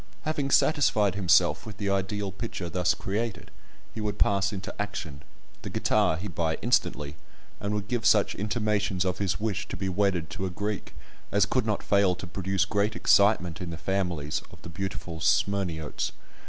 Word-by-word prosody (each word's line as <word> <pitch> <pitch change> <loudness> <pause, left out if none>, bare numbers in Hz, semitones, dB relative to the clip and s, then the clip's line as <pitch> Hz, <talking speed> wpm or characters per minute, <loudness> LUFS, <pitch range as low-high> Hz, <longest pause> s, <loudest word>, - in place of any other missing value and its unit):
Having 150 -3 -1
satisfied 110 - +3
himself 90 +1 +3
with 110 -3 -9
the 100 -2 -1
ideal 100 +1 -1
picture 95 -3 -5
thus 90 -1 +1
created, 105 -2 -3 0.4
he 110 - -5
would 105 -1 -2
pass 100 0 +2
into 95 -2 -5
action; 80 -9 -5 0.4
the - - -6
guitar 80 - +2
he 95 +5 -5
would 90 - -9
buy 80 -2 0
instantly, 75 0 +1 0.4
and 105 +1 -2
would 105 -1 -3
give 120 -1 -1
such 110 -2 +4
intimations 105 -3 0
of 90 -1 -1
his 95 -3 0
wish 105 -2 -2
to - - -6
be 95 - -2
wedded 90 -4 0
to 95 +3 -3
a - - -3
Greek, 105 +3 -4 0.4
as 100 0 +4
could 120 +3 0
not 105 - -1
fail 100 -3 +3
to 95 - -7
produce 95 +2 0
great 100 +2 0
excitement 95 -5 +3
in 90 - -4
the 85 - -5
families, 85 -5 -1
of - - -14
the - - -8
beautiful 85 -1 -5
Smyrniotes. 85 -2 0
100 Hz, 180 wpm, -27 LUFS, 90-105 Hz, 0.4 s, such